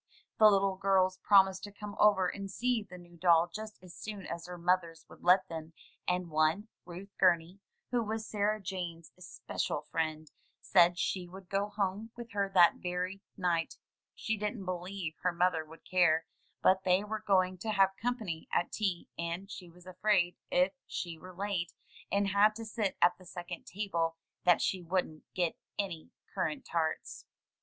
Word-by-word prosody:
The 215 -1 +9
little 195 -1 +2
girls 185 -1 +2
promised 190 -1 +5
to 205 - -9
come 205 0 -8
over 200 -3 +5
and 195 +1 -5
see 245 +3 0
the 190 -3 -11
new 175 -1 -15
doll 170 0 +5
just 215 0 -6
as 180 -1 -12
soon 210 -3 -7
as 170 0 -5
their 180 0 -7
mothers 170 -1 0
would - - -15
let 185 +1 +5
them, 160 -1 -7 0.3
and 180 -2 0
one, 155 +8 +2 0.2
Ruth 180 +3 -9
Gumey, 180 0 +3 0.3
who 245 -1 +2
was 220 0 -3
Sarah 210 0 0
Jane's 175 -4 -5
especial 180 -4 -4
friend, 155 0 -3 0.3
said 175 -2 +4
she 180 0 -1
would 185 0 -12
go 200 +1 0
home 205 +1 -2
with 235 -1 -8
her 200 -1 0
that 175 -3 +6
very 180 +2 -3 0.2
night 170 -3 0 0.2
— - - -62
she 220 0 -2
didn't 210 0 -3
believe 180 -1 -4
her 180 - +2
mother 175 -2 +1
would 160 +1 -15
care 165 -3 +3 0.2
— - - -41
^but 190 0 +5
they 185 +1 +3
were 215 +1 -4
going 185 -2 +2
to 220 - -4
have 195 -2 +3
company 220 -9 -2
at 175 - +1
tea, 195 -5 -1
and 170 +4 -4
she 180 -4 -8
was 175 +1 -17
afraid 185 -1 +1
if 180 +2 +3
she 170 -2 -5
were 185 +2 -10
late, 185 -2 -2 0.4
and 200 0 +2
had 205 +2 +4
to 225 0 -6
sit 220 -3 -2
at 175 +1 +4
the 185 - -15
second 175 0 -7
table, 170 -5 -1 0.3
that 175 -2 +5
she 185 - 0
wouldn't 175 -3 -3
get 175 -3 0 0.2
any 180 -6 -3 0.2
currant 165 -6 -2
tarts. 160 -2 -2
185 Hz, 180 wpm, -32 LUFS, 175-200 Hz, 0.4 s, The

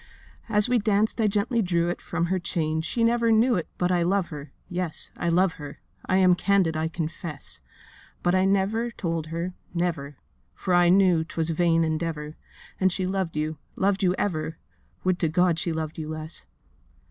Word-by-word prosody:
'As 210 -1 +4
we 245 -1 +3
danced 215 +2 +1
I 215 - +4
gently 215 +4 +1
drew 175 -3 +1
it 175 - -4
From 170 - -1
her 185 +2 0
chain—she 160 +5 -1
never 230 0 +3
knew 230 +3 +4
it 175 -6 -1
But 180 0 +1
I 175 -1 +2
love 185 +1 +1
her—yes, 155 +4 -5
I 175 - -1
love 180 +1 +3
her: 145 -1 -8 0.3
I 185 - +3
am 185 -1 +6
candid, 185 -3 +2
I 160 +1 0
confess. 160 -2 -5 0.6
But 175 - +2
I 185 0 +3
never 200 +5 +1
told 165 -7 -3
her, 170 +3 -3 0.2
never, 155 -5 -2 0.4
For 185 - -2
I 175 0 +5
knew 180 -3 +5
'twas 165 0 -2
vain 165 0 +3
endeavour, 155 -1 -2 0.4
And 190 0 +3
she 185 +1 -1
loved 185 -4 -2
you—loved 155 +6 -1
you 180 -1 +3
ever, 160 -5 -2 0.5
Would 185 -1 +1
to 165 - +2
God 175 0 +2
she 170 - -1
loved 160 0 -4
you 155 -1 -5
less! 155 0 -5
175 Hz, 175 wpm, -26 LUFS, 160-195 Hz, 0.6 s, am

